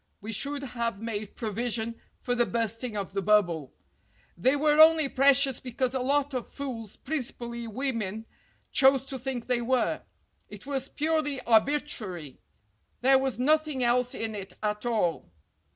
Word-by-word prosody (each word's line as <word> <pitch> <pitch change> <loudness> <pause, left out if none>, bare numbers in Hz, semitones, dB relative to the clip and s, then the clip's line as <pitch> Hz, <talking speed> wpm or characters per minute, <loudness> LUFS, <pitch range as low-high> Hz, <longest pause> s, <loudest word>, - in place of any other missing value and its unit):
we 215 +3 -6
should 280 +6 -2
have 235 -5 -3
made 215 -2 -5
provision 230 +1 -2 0.3
for 245 - -1
the 245 0 +3
bursting 230 0 -2
of 195 -2 -4
the 195 - -1
bubble. 180 -8 +2 0.6
They 255 +11 +2
were 300 +1 +3
only 315 -1 +7
precious 275 -1 +4
because 255 0 -2
a 260 - 0
lot 280 +2 +1
of 250 -2 -3
fools, 235 -7 -6
principally 235 -5 -4
women, 225 -3 -3 0.5
chose 265 0 +5
to 270 -1 -6
think 250 -2 -4
they 250 -1 0
were. 250 +1 0 0.5
It - - -11
was 270 -1 -3
purely 305 -2 0
arbi 235 +5 +4
trary. 185 - -6 0.6
There 265 +1 +5
was 265 -1 -1
nothing 300 0 +2
else 245 +1 +2
in 225 -1 -3
it 195 -3 -7
at 210 +2 -1
all. 195 - 0
245 Hz, 150 wpm, -28 LUFS, 220-275 Hz, 0.6 s, only